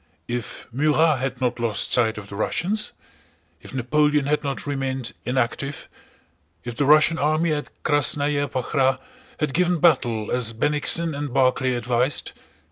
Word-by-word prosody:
If 120 -1 -5
Murat 150 +2 +2
had 135 +1 -3
not 125 -2 -1
lost 115 -3 -1
sight 110 -3 +2
of 105 -1 -8
the 100 - -9
Russians? 195 - -1 0.7
If - - -12
Napoleon 150 +3 +1
had 150 +1 0
not 140 -1 -4
remained 135 -3 -3
inactive? 130 +3 -2 0.8
If 120 -1 -6
the 140 - 0
Russian 155 +3 +5
army 155 +2 +1
at 145 -1 -4
Krásnaya 145 0 +2
Pakhrá 130 +1 +1 0.4
had 150 -3 -1
given 180 +1 +2
battle 120 -10 +2
as 120 -2 0
Bennigsen 150 +6 +1
and 145 -1 -4
Barclay 130 -1 +2
advised? 125 +3 0
135 Hz, 140 wpm, -23 LUFS, 125-150 Hz, 0.8 s, Russian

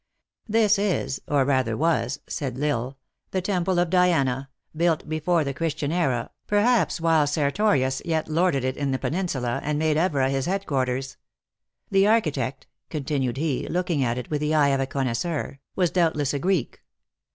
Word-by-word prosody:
" - - -68
This 215 -2 +3
is, 195 -9 -1
or 140 -2 +2
rather 130 -5 +1
was," 140 -5 0
said 135 -6 -4
L 145 - 0
Isle, 130 -1 -1 0.2
" - - -52
the 190 - 0
temple 185 -1 0
of 175 -1 +1
Diana, 140 -8 +2 0.3
built 165 -1 +1
before 155 +2 +1
the 140 -1 -3
Christian 155 -1 -2
era, 135 -9 0 0.2
perhaps 210 -3 +2
while 165 -3 +3
Sertorius 145 -2 +1
yet 160 -2 -1
lorded 155 -3 +1
it 130 0 -1
in 140 -1 -1
the 130 - 0
Peninsula, 140 -8 -2
and 150 0 -1
made 155 0 +1
Evora 145 -6 +1
his 135 +1 -1
headquarters. 135 -9 -1 0.7
The 195 0 +4
architect," 150 - 0 0.2
continued 135 -5 -2
he, 145 -3 -1
looking 175 -5 0
at 120 -1 0
it 125 - -6
with 150 -1 -1
the 150 +1 +1
eye 145 -2 +4
of 135 -1 +1
a 135 - -1
connoisseur, 135 +3 -2
" - - -53
was 180 -3 +1
doubtless 160 -6 +1
a 140 - -1
Greek. 180 -3 -1
150 Hz, 175 wpm, -25 LUFS, 135-175 Hz, 0.7 s, The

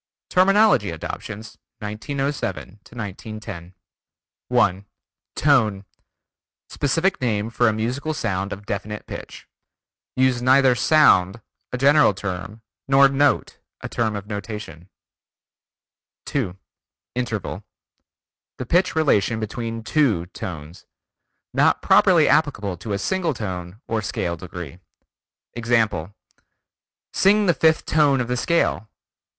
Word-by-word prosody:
TERMINOLOGY 195 - +4
ADOPTIONS, 105 +6 -7 0.2
1907 110 -1 -4
1910 105 -4 -8 0.7
1. 100 -6 +1 0.5
Tone: 110 -9 +2 0.8
Specific 165 +6 0
name 110 -2 -1
for 120 +1 +2
a - - +4
musical 125 +8 -2
sound 100 -5 -2
of 100 +1 -7
definite 105 +1 -5
pitch. - - -9 0.7
Use 130 -1 +2
neither 130 +1 +5
sound, 115 - +4 0.3
a 125 - -2
general 140 -4 +4
term, 95 +2 -6 0.2
nor 135 0 +6
note, 140 +1 +1 0.2
a - - -5
term 110 -3 -1
of 100 -1 -6
notation. 100 -5 -7 1.4
2. 100 -10 -2 0.6
Interval: 120 -5 -4 0.9
The 125 - -5
pitch 175 +8 +2
relation 115 -8 +2
between 115 +1 -5
two 110 - +1
tones. 85 -2 -9 0.7
Not - - +2
properly - - +5
applicable 100 -3 +1
to 105 +2 -5
a - - 0
single 170 - -1
tone 95 -2 -6
or 115 -1 -1
scale 85 -3 -3
degree. 85 -1 -9 0.7
Example: 110 -6 0 1.0
"Sing 205 +2 +4
the 175 - +4
fifth 160 0 +2
tone 145 -3 +3
of 120 - -1
the 125 - -1
scale." 125 -6 0
110 Hz, 110 wpm, -22 LUFS, 100-135 Hz, 1.4 s, nor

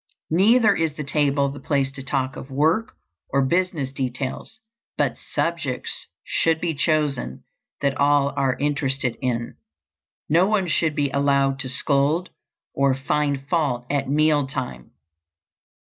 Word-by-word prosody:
Neither 215 +5 +5
is 160 -2 0
the 155 - -4
table 140 -1 +1
the 145 - -8
place 140 -3 0
to 135 - -8
talk 130 0 -1
of 130 - -9
work 160 +11 +1 0.4
or 135 -1 +2
business 165 -4 0
details, 130 - -4 0.4
but - - +1
subjects 160 -7 -3 0.2
should 165 -1 +1
be 170 -1 -1
chosen 145 - -1 0.4
that 140 -1 +1
all 140 0 +3
are 135 -2 +1
interested 140 -3 0
in. 120 - -2 0.7
No 170 +5 +4
one 205 -3 +1
should 155 -2 +1
be 145 -2 0
allowed 140 -1 +2
to 130 -1 -3
scold 145 +5 +1 0.4
or 135 -1 +2
find 140 0 -1
fault 140 -7 0
at 140 -2 0
meal 150 -1 +3
time. 65 - -5
140 Hz, 135 wpm, -23 LUFS, 135-155 Hz, 0.7 s, Neither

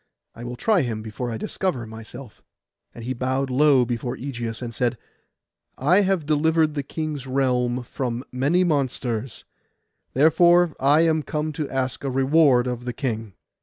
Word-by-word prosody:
I 120 - -10
will 120 0 -5
try 205 - +2
him 115 -5 -3
before 110 +3 -5
I 115 - -3
discover 130 - -2
myself;' 115 +2 -11 0.5
and 115 - -9
he 130 +2 -2
bowed 130 +2 -1
low 135 -1 +4
before 120 +1 -3
Ægeus, 120 -4 -5
and 120 -2 -6
said, 120 +1 0 0.8
'I 175 +9 +4
have 190 -5 0
delivered 155 +1 +2
the 145 - -2
king's 150 -1 -5
realm 125 -2 0
from 125 -1 -4
many 145 +8 +2
monsters; 130 -7 -2 0.7
therefore 170 +3 +5
I 145 +4 +4
am 160 -1 +2
come 150 +1 -3
to 150 -2 -4
ask 130 -3 -2
a 135 - -1
reward 135 -1 +4
of 125 -1 -4
the 125 - -3
king. 110 -6 -4
130 Hz, 160 wpm, -23 LUFS, 120-150 Hz, 0.8 s, therefore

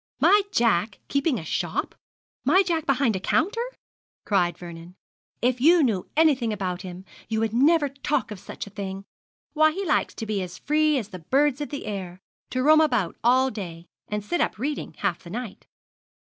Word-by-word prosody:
'My 410 +1 +6
Jack 220 - +2
keeping 280 -1 +1
a 160 - -6
shop! - - -2 0.5
my 380 - +5
Jack 330 -4 -1
behind 270 -5 +2
a - - -1
counter!' 460 - 0 0.6
cried 180 -4 +1
Vernon: 170 0 -10 0.5
'if 250 0 +1
you 330 +3 +6
knew 215 -8 0
anything 275 -8 +4
about 185 -3 -3
him 185 0 -8 0.2
you 220 -1 0
would 225 -1 0
never 290 +5 +4
talk 275 -4 -2
of 210 - -6
such - - -7
a 205 - -12
thing. 195 -1 -6 0.5
Why 310 0 +5
he 385 +5 -4
likes - - +1
to 225 - -5
be 210 -2 -1
as 180 -1 -6
free 305 0 +2
as 215 -5 -4
the 185 - -8
birds 275 - +1
of 290 - -3
the 285 - -5
air 185 -4 -5 0.3
to 255 0 -1
roam 310 +2 +6
about 245 - +1
all 260 +2 +4
day 175 -5 -7 0.2
and 210 -1 -3
sit 345 +10 0
up - - 0
reading 285 +6 -4
half 190 -4 -1
the 170 - -12
night.' 225 +1 -7
235 Hz, 185 wpm, -25 LUFS, 195-295 Hz, 0.6 s, My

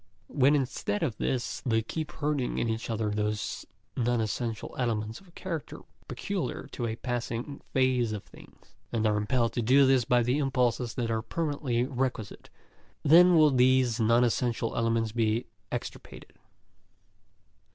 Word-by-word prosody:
When, 140 +1 +4
instead 125 -6 -1
of 110 - -1
this, 125 -2 -2
they 110 -3 +1
keep 155 +7 -4
hurting 145 -4 -1
in - - 0
each 110 +1 -3
other 110 -2 -1
those 105 -1 -2 0.3
non 120 -1 +1
essential 110 0 -3
elements 110 -3 -2
of 180 -3 -21
character 165 -5 -5 0.3
peculiar - - -4
to 120 - -3
a 110 - -3
passing 120 +2 -4
phase 130 -3 +2
of 105 -2 -4
things, - - -18 0.2
and 115 -2 0
are 105 -1 +3
impelled 115 +3 0
to 120 - -1
do 135 +5 +5
this 130 -2 +4
by 120 +1 +3
impulses 125 -2 0
that 115 -2 -1
are 110 0 0
permanently 140 -2 -1
requisite, 125 -5 -3 0.5
then 175 +4 +7
will 155 -2 +6
these 130 -2 +3
non 115 +2 +4
essential 120 -1 0
elements 115 -1 +1
be 115 +1 0 0.3
extirpated. 125 - -7
120 Hz, 145 wpm, -28 LUFS, 115-130 Hz, 0.5 s, then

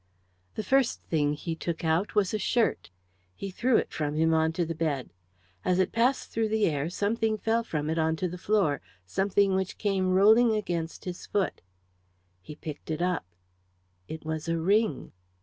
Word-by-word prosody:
The 215 - -3
first 270 0 +2
thing 150 -3 +1
he 165 +2 -4
took 170 0 -4
out 165 +7 +1
was 205 -2 +2
a 215 - 0
shirt. 230 +3 +1 0.5
He 195 - -6
threw 240 +5 +2
it - - -1
from 150 -1 -2
him 160 +1 +3
on 160 0 +3
to 175 +1 0
the 165 - -3
bed. 150 -5 -2 0.5
As 180 - +2
it 185 - +2
passed 245 +4 +1
through 225 -1 0
the 220 -1 +2
air 150 -1 0
something 215 +4 0
fell 225 +2 +1
from 150 -9 -3
it 160 +1 0
on 160 0 +2
to 180 +3 -1
the 180 +1 -7
floor 185 -8 +1 0.2
something 195 - +2
which 190 0 -1
came 195 -3 0
rolling 220 +5 +5
against 170 -6 -3
his 180 -1 -6
foot. 200 -2 -1 0.8
He 150 - -10
picked 150 0 -8
it 160 +2 -1
up. 180 - -1 0.8
It 160 0 -7
was 160 0 -3
a 165 - +1
ring. 195 - +1
180 Hz, 185 wpm, -28 LUFS, 160-210 Hz, 0.8 s, rolling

